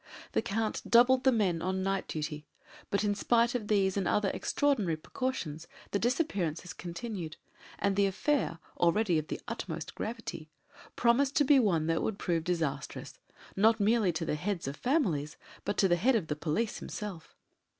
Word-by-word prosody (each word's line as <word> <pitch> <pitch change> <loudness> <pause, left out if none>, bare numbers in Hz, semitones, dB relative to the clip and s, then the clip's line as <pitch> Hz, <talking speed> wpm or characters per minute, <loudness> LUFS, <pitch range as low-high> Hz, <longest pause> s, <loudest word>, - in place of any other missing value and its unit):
The - - +1
Count 220 +1 -2
doubled 250 +2 +5
the 265 - +7
men 190 -8 +1
on 185 +1 -1
night 195 0 -1
duty, 150 -1 -4 0.4
but 200 - +1
in 205 -1 +2
spite 235 +3 +2
of 230 -4 -2
these 195 -3 +2
and 195 -2 0
other 205 -2 +2
extraordinary 220 - +1
precautions 170 - -4 0.2
the 200 - +1
disappearances 195 - -1
continued, 175 -2 -6 0.4
and 200 -1 +1
the 200 0 +4
affair 200 - 0 0.2
already 175 0 +3
of 155 - -6
the - - -4
utmost - - -5
gravity 220 -8 -5 0.5
promised 265 +4 +3
to 295 - +5
be 280 0 +6
one 175 -10 +2
that 165 0 +1
would 220 - -2
prove 170 -5 -1
disastrous, 165 -5 -3 0.4
not 220 +3 +4
merely 210 -2 +3
to 160 +1 -2
the - - -1
heads 175 +1 -2
of 140 - -3
families, 170 - 0 0.3
but 205 - -1
to 195 - +4
the 175 -1 +3
head 245 +9 +3
of 185 -8 -1
the 150 - 0
police 170 +9 -1
himself. 190 -6 -7
195 Hz, 170 wpm, -31 LUFS, 165-230 Hz, 0.5 s, the